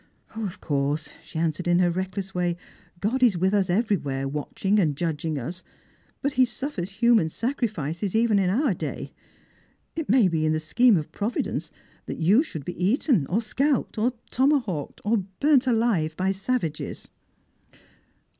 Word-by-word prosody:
" - - -45
Of 210 -5 -4
course," 145 +1 -1
she - - -9
answered 165 +2 -1
in 175 0 +4
her 175 -1 +3
reckless 190 +2 -4
way, 175 -1 0 0.2
" 175 - -30
God 240 +6 0
is 230 -8 +5
with 190 +3 +1
as 200 -3 +2
everywhere, 175 - 0
watching 170 +8 0
and 155 -7 +2
judging 160 -2 -2
us. 165 +8 -5 0.6
But 280 0 0
He 255 - +5
sufi'ers 240 -6 -3
human 230 -4 +4
Bacrifices, 205 - -2
even 225 -2 +3
in 185 -2 +2
our 245 +3 +2
day. - - -5 0.8
It 325 -2 -4
may 235 -3 +5
be 160 -3 0
in 155 0 +2
the 155 - 0
scheme 210 +8 +4
of 150 - -4
Provi 215 +4 -1
dence - - -4 0.4
that - - -4
you 190 - +4
should 160 - -6
be 180 0 -4
eaten, 210 - +2
or 220 +6 0
scalped, 270 +1 0
or 240 +3 +2 0.2
tomahawked, 250 - 0
or 215 -2 +2 0.2
\urnt 280 -3 +4
alive 220 -10 +1
by 190 +1 +1
savages." 195 -5 -3
190 Hz, 165 wpm, -25 LUFS, 165-235 Hz, 0.8 s, is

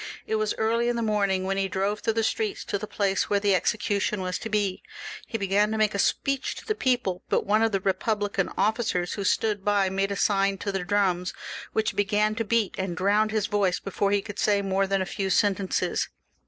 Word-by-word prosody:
It 220 - 0
was 215 -1 0
early 230 +2 +1
in 240 - 0
the 235 - -1
morning 200 -3 +1
when 195 +1 -1
he 195 0 +1
drove 195 +2 -1
through 225 - 0
the 225 - +1
streets 420 - -1
to 200 - -2
the 215 - -6
place 195 -2 0
where 205 - +3
the 200 -1 +2
execution 205 +2 0
was 185 0 -2
to 225 - -5
be. 205 -3 0 0.5
He 225 - -3
began 200 +1 +2
to 220 - -2
make 215 -1 +2
a 200 - -2
speech 275 +6 0
to - - -10
the 430 - 0
people; 245 - 0
but - - +1
one 215 +2 +3
of 225 0 +3
the 195 - +1
Eepublican 200 +1 -1
officers 200 -4 0
who 200 - -3
stood 205 +1 +1
by 200 -2 +2
made 195 +1 0
a - - -1
sign 195 -1 +2
to 200 - -3
the 195 -2 -2
drums, 180 -1 0 0.4
which 220 0 0
began 210 +1 +2
to 225 +1 -2
beat, 225 -2 +1
and 190 -2 -3
drowned 205 +3 +2
his 215 -2 0
voice 200 -3 +1
before 195 0 -1
he 200 -1 +1
could 205 - -8
say 200 -1 +2
more 195 0 +1
than 195 -1 +1
a - - -5
few 195 +1 -3
sentences. 195 0 +1
205 Hz, 225 wpm, -26 LUFS, 195-215 Hz, 0.5 s, where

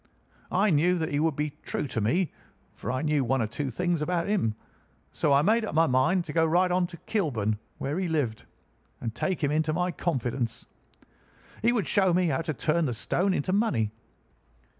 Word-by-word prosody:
I 200 +2 +3
knew 175 +4 +3
that 160 -2 -1
he 145 - 0
would 160 -1 +1
be 150 +1 -1
true - - -3
to 115 - -2
me, 160 - +1 0.4
for 110 - -5
I 130 +4 -2
knew 150 -3 +2
one 130 +2 +1
or 115 - +1
two 130 +6 -3
things 175 +5 -1
about 170 +2 0
him; 185 - +1 0.6
so 150 - 0
I 140 +1 +5
made 225 +5 +3
up 215 - -4
my 165 +1 +5
mind 160 +7 +2
to 150 - -6
go 165 - +3
right 175 +3 +3
on 180 0 +2
to 170 - -11
Kilburn, 110 - 0 0.2
where 145 +6 -2
he 190 - -1
lived, 140 -9 -1 0.5
and 115 -2 -4
take 170 +7 -2
him 145 - +2
into 155 0 +1
my 180 +2 0
confidence. 125 -8 -2 1.0
He 235 - +4
would 230 -6 0
show 190 -4 +3
me 180 -2 +2
how 135 +2 0
to 160 -1 -2
turn 160 +5 +1
the 125 - -1
stone 185 - 0
into 185 +1 0
money. 140 - +1
160 Hz, 205 wpm, -27 LUFS, 130-180 Hz, 1.0 s, I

